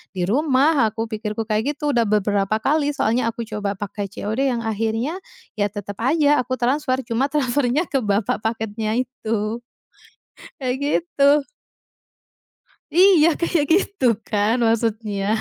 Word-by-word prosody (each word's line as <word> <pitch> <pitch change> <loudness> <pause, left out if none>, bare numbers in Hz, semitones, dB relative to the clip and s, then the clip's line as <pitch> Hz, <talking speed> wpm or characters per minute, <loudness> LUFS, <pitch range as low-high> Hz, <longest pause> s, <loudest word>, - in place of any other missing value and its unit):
di 180 -1 -1
rumah, 275 +1 +3
aku, 225 +1 -4
pikirku 215 0 -4
kayak 220 +6 0
gitu. 295 +1 -1
Udah 235 - +4
beberapa 205 0 +1
kali 290 +4 +1
soalnya, 230 0 +1
aku 230 0 -7
coba 205 -2 -3
pakai 205 -1 -5
COD, 235 +7 -1
yang 235 - -1
akhirnya, 225 - -1 0.4
ya 205 -1 +1
tetep 205 -1 -6
aja 295 +3 +3
aku 255 +1 -4
transfer, 260 +1 0
cuma 260 +4 0
transfernya 285 +2 +1
ke 270 - 0
bapak 205 0 0
paketnya 220 0 -2
itu, 230 -2 -3 1.0
kayak 255 -1 -1
gitu. 290 -2 +2 1.5
Iya, 355 -2 +6
kayak 340 -3 +1
gitu, 390 -3 0 0.2
kan, 210 +2 +1
maksudnya. 220 -3 -1
230 Hz, 130 wpm, -21 LUFS, 215-285 Hz, 1.5 s, Iya